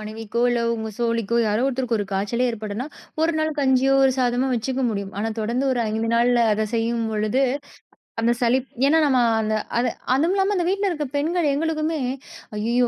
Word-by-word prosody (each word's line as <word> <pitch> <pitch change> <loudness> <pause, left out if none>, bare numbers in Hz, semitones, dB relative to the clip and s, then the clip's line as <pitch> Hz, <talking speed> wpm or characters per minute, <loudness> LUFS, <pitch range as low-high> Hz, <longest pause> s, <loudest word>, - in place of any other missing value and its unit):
மனைவிக்கோ, 220 +1 -5
இல்லை 240 -1 0
உங்க 220 -1 -4
தோழிக்கோ 230 -1 0
யாரோ 215 +5 +1
ஒருத்தருக்கு 250 -3 -1
ஒரு 205 - -2
காய்ச்சலே 220 +6 0
ஏற்படும்னா, 220 +2 -5 0.4
ஒரு 330 +1 +2
நாள் 310 0 +1
கஞ்சியோ 265 0 +3
ஒரு 265 - +4
சாதமோ 250 +1 +1
வச்சுக்க 260 +3 -2
முடியும். 200 -2 -4
ஆனா 220 - -1
தொடர்ந்து 235 +5 -1
ஒரு 245 - 0
5 225 +1 -1
நாள்ல 240 0 +3
அதை 215 +1 0
செய்யும்பொழுது 225 +1 0 0.8
அந்த 230 +1 +2
சளிப் 250 +2 +1 0.2
ஏன்னா 300 +3 +4
நம்ம 265 -3 +3 0.2
அந்த 215 0 0 0.2
அதை 245 +1 +2 0.2
அதுவும் 320 +8 +2
இல்லாம 390 +1 +2
அந்த 350 -2 0
வீட்டில 395 +1 +1
இருக்க 305 -4 -2
பெண்கள் 325 +3 0
எங்களுக்குமே, 315 +1 -1 0.6
அய்யய்யோ! 235 +4 +1
245 Hz, 170 wpm, -23 LUFS, 225-275 Hz, 0.8 s, ஒரு